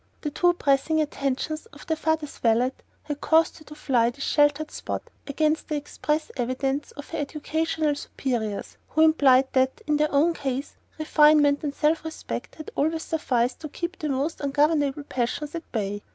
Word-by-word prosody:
The 295 - -3
too 350 +4 +3
pressing 310 0 +2
attentions 300 +3 -2
of - - -14
their 320 - 0
father's 315 -2 -2
valet 235 +2 +3 0.3
had 295 -1 -5
caused 325 +1 +3
her - - -14
to 300 - -11
fly 245 -6 +2
this 275 +3 -7
sheltered 295 +1 +2
spot, - - -4 0.2
against 305 +2 0
the 305 - -2
express 300 +1 -2
advice 270 +3 -1
of 285 - -9
her - - -3
educational 310 +1 -1
superiors, 240 -7 -3
who 315 - +1
implied 270 -4 +5
that, 260 0 +2
in 300 0 +2
their 300 +1 +1
own 305 +4 +3
case, 275 -2 -3 0.2
refinement 300 -2 +4
and 285 -1 -3
self 310 +1 +2
respect 320 0 -6
had 310 - -9
always 320 +3 0
sufficed 250 -6 0
to 305 - -7
keep 345 +5 -5
the 305 - -2
most 280 +4 -1
ungovernable 290 0 +1
passions 260 +3 -3
at 335 -1 -7
bay. 205 -2 -2
295 Hz, 170 wpm, -25 LUFS, 270-315 Hz, 0.3 s, implied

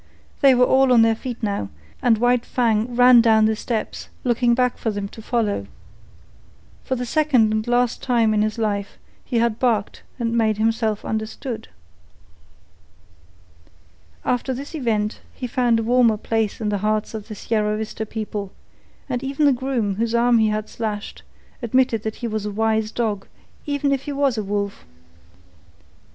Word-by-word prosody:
They 270 -2 +6
were 250 0 +5
all 265 0 +4
on 235 -2 +6
their 225 0 +4
feet 240 +1 -7
now, 200 - -2 0.3
and 230 -2 +4
White 245 +1 +2
Fang 235 -1 0
ran 245 -1 +7
down 220 -1 +4
the 220 0 +2
steps, 225 0 -4
looking 240 -1 +2
back 250 0 +1
for 225 - -1
them 205 -2 -3
to 225 - -11
follow. 215 - -1 1.2
For 260 - -2
the 250 0 -3
second 255 -5 +3
and 215 +1 -1
last 245 0 +1
time 230 -4 +2
in 210 - +2
his 215 +1 -1
life 205 -3 -2 0.3
he 245 - -2
had 230 -1 +1
barked 225 -6 0 0.2
and 235 -2 -1
made 220 -2 +2
himself 220 -1 0
understood. 220 +1 -4 2.6
After 250 +1 0
this 280 +5 -8
event 225 -7 -1
he 255 - -5
found 240 -1 +1
a - - -1
warmer 235 -2 +3
place 225 0 -1
in 215 -2 -1
the 205 -1 -1
hearts 215 +2 -1
of 215 -2 -6
the 215 - -7
Sierra 210 0 -1
Vista 220 0 -4
people, 210 -2 -5 0.6
and 250 -2 -3
even 275 +3 0
the 285 - +5
groom 240 -6 -1
whose 230 +1 0
arm 235 0 +4
he 220 - +3
had 215 0 -2
slashed 215 -2 -5 0.4
admitted 240 -1 +1
that 220 0 -4
he - - 0
was 215 -2 -3
a - - -3
wise 220 +1 0
dog 215 -5 -2 0.4
even 285 -1 0
if 275 -1 -1
he 290 - -4
was 275 -3 +1
a 215 - -2
wolf. 200 0 -3
225 Hz, 170 wpm, -22 LUFS, 215-245 Hz, 2.6 s, ran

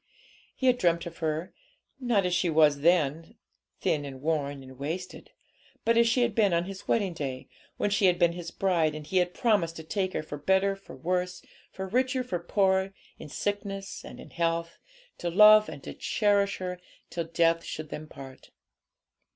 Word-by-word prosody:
He 260 - -3
had 250 -1 +4
dreamt 170 -3 +2
of 170 -1 -9
her, 160 +2 -2 0.5
not 235 -7 +1
as 180 - 0
she 180 0 +1
was 150 -2 +4
then, 165 -1 +1 0.5
thin 150 -2 +1
and 135 -2 -8
worn 145 -2 -2
and 130 0 -13
wasted, 170 +6 -5 0.6
but 230 - +3
as 235 0 +5
she 245 +2 +3
had 235 -3 0
been 205 -5 +3
on 170 +1 +1
his 195 0 -9
wedding 200 -6 +1
day, 135 -5 -5 0.3
when 205 - 0
she 200 -1 +3
had 180 -1 +3
been 170 -1 +4
his 170 -1 -6
bride, 165 -5 +1
and 155 -1 -7
he 185 +5 -1
had 180 0 +1
promised 200 -8 +1
to 160 - -8
take 185 +3 -2
her - - -2
'for 145 -1 -7
better, 190 +5 +2
for 195 - -13
worse, 180 +1 -2 0.3
for 190 0 -6
richer, 255 +5 +1
for 185 -8 -3
poorer, 190 +1 +1 0.2
in 150 - -9
sickness 200 +2 -4
and - - -10
in - - -12
health, 170 0 -1 0.4
to 175 - -2
love 210 +4 +7
and 140 - -9
to - - -7
cherish 200 -2 +1
her, 180 -1 -5 0.3
till 170 -1 -3
death 165 0 +2
should 155 -1 -6
them 155 0 -7
part.' 135 -3 -12
175 Hz, 190 wpm, -28 LUFS, 160-195 Hz, 0.6 s, love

